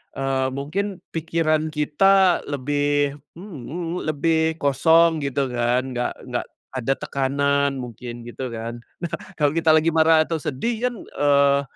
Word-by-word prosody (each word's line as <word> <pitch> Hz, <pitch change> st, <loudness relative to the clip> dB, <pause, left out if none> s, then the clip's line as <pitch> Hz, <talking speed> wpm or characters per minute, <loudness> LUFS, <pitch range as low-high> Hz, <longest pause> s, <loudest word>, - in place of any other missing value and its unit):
eee, 135 Hz, -1 st, 0 dB
mungkin 185 Hz, +6 st, -3 dB
pikiran 160 Hz, -1 st, 0 dB
kita 175 Hz, +5 st, +3 dB
lebih 145 Hz, +1 st, 0 dB, 0.2 s
mhm 180 Hz, -3 st, -9 dB
mhm, 170 Hz, +3 st, -4 dB
lebih 160 Hz, +1 st, +1 dB
kosong, 160 Hz, +3 st, +4 dB
gitu 140 Hz, -2 st, -1 dB
kan. 125 Hz, +2 st, 0 dB
Nggak 125 Hz, 0 st, -2 dB
nggak -, -, -3 dB, 0.3 s
ada 130 Hz, 0 st, 0 dB
tekanan, 140 Hz, +1 st, 0 dB
mungkin, 120 Hz, -1 st, -7 dB
gitu 125 Hz, +2 st, -6 dB
kan. 115 Hz, +1 st, -5 dB, 0.2 s
Nah, 170 Hz, -, -2 dB, 0.2 s
kalau 145 Hz, -2 st, +2 dB
kita 160 Hz, -1 st, +3 dB
lagi 160 Hz, +1 st, +3 dB
marah 160 Hz, 0 st, +5 dB
atau 165 Hz, 0 st, -3 dB
sedih 220 Hz, -, -2 dB
kan, 245 Hz, -, -4 dB
eee, 140 Hz, -1 st, +3 dB
145 Hz, 140 wpm, -23 LUFS, 135-165 Hz, 0.3 s, marah